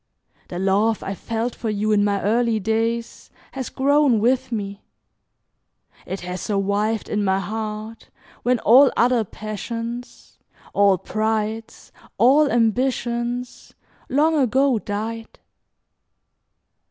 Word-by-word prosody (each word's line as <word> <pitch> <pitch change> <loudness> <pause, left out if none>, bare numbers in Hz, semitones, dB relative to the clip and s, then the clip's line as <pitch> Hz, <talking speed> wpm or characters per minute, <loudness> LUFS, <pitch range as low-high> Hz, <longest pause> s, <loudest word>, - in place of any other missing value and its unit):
The 175 - -6
love 200 +4 +1
I 195 - -3
felt 230 +4 -3
for 225 - -4
you 210 +1 0
in 205 -1 +3
my 200 -1 0
early 230 +1 +1
days 225 +2 -2 0.2
has 265 -2 -5
grown 280 -3 +3
with 255 +3 +1
me. 200 -2 -4 1.3
It 190 +2 -5
has 180 0 -5
survived 205 +2 -1
in 210 -1 -1
my 190 -1 +2
heart 215 +2 -5 0.3
when 250 +1 +2
all 260 +5 +6
other 240 -1 +3
passions, 230 +4 -7 0.3
all 200 -2 +4
prides, 220 +3 -3 0.3
all 280 +4 +5
ambitions, 240 +1 -1 0.3
long 305 +4 +3
ago 265 -2 +2
died. 220 +3 -5
225 Hz, 110 wpm, -22 LUFS, 210-245 Hz, 1.3 s, all